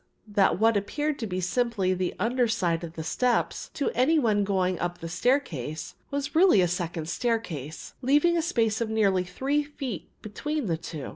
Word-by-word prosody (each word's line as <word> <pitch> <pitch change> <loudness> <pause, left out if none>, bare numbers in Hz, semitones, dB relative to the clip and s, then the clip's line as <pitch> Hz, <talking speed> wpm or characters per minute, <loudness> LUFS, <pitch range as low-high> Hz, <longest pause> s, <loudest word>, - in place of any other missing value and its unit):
The - - -42
fact - - -44
was, 205 -2 -16
that 190 -4 +4
what 225 -1 +5
appeared 295 +9 -2
to 225 - -3
be 185 -1 -2
simply 195 0 +1
the 185 -1 -2
under 240 +4 +1
side 175 -6 0
of 165 -1 -6
the 160 - -5
steps, 245 +9 0
to 280 - 0
any 285 +6 +3
one 215 -7 +2
going 185 -2 0
up 175 0 -2
the 165 - -7
staircase, 160 - -1 0.2
was 285 0 -3
really 345 - +6
a 180 - +4
second 170 -2 -3
staircase, 175 - -3
leaving 295 +6 +3
a 335 - +2
space 230 -10 0
of 230 - -1
nearly 200 -4 +2
three 265 +11 0
feet 270 - -6
between 295 +7 -3
the 165 -5 0
two. 160 -3 -7
210 Hz, 200 wpm, -27 LUFS, 175-260 Hz, 0.2 s, really